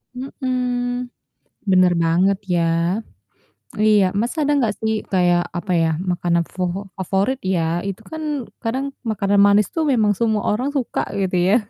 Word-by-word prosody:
Mhm, 250 -1 -2 0.7
bener 185 -1 +5
banget 180 +4 +3
ya. 175 -3 +1 1.2
Iya, 210 -2 +5
Mas 235 +3 -1
ada 295 -1 +2
nggak 230 -7 +1
sih 220 0 0 0.2
kayak 175 -2 +2
apa 185 +2 -4
ya 165 - +2 0.2
makanan 170 -1 +1
fofo 180 0 -2 0.2
favorit 195 +7 0
ya, 170 - +1 0.3
itu 195 -1 -5
kan 315 0 -5 0.4
kadang 255 +4 -1 0.2
makanan 205 -3 +1
manis 205 0 +4
tuh 325 - +1
memang 220 -5 +3
semua 220 -3 +1
orang 250 +7 0
suka 255 - -1 0.2
gitu 190 -1 0
ya. 205 - +5
205 Hz, 145 wpm, -21 LUFS, 185-245 Hz, 1.2 s, bener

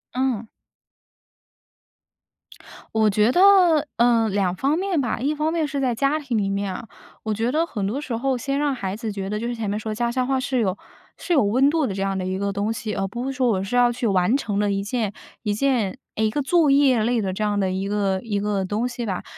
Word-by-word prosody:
嗯。 250 -4 -1 2.4
我 220 -1 +3
觉 210 +3 +3
得， 355 -4 +5
呃， 235 -2 +3
2 190 -3 0
方 275 - +1
面 375 -3 0
吧。 245 - -2
一 280 +5 0
方 305 +1 0
面 325 -2 0
是 280 0 -3
在 250 -3 +1
家 275 +5 +1
庭 265 -6 -2
里 200 -2 0
面 200 -1 -2
啊， 230 - -8 0.4
我 220 - -1
觉 225 +3 -1
得 320 +4 +1
很 210 -11 -4
多 235 +8 -2
时 260 -5 -4
候 260 +2 0
先 275 +3 -2
让 290 -1 +1
孩 195 -5 -4
子 220 0 -4
觉 195 -1 -5
得， 210 +1 -2
就 235 - -3
是 240 - -3
前 220 -3 -3
面 205 +1 -1
说 215 0 -4
家 235 +2 -1
乡 255 0 -1
话 265 -1 +1
是 260 -1 -1
有 195 -4 0 0.4
是 355 - -2
有 280 -7 +4
温 250 +7 +3
度 315 -1 +1
的 195 - -3
这 195 - -3
样 195 0 -1
的 185 - -3
一 185 0 -2
个 200 +1 -1
东 205 +2 -1
西， 220 -1 -4
而 195 0 -1
不 240 +6 -5
是 270 - -2
说 255 -2 +1
我 190 -4 0
是 195 +5 -3
要 245 -1 +5
去 240 0 -2
完 195 +3 +2
成 205 -7 -2
的 205 -1 +1
一 195 0 -1
件 210 -1 -2 0.3
一 210 -2 0
件 230 -4 0 0.2
诶， 220 0 +1
一 - - 0
个 290 +7 -1
作 315 +2 +3
业 270 -5 +4
类 235 0 +1
的 190 -2 -2
这 215 - -3
样 205 -1 0
的 190 -2 0
一 190 +1 -2
个 200 -2 0
一 205 -2 -2
个 205 -1 -1
东 210 +5 -1
西 245 -1 -5
吧。 190 -4 -3
225 Hz, 265 characters per minute, -23 LUFS, 200-265 Hz, 2.4 s, 得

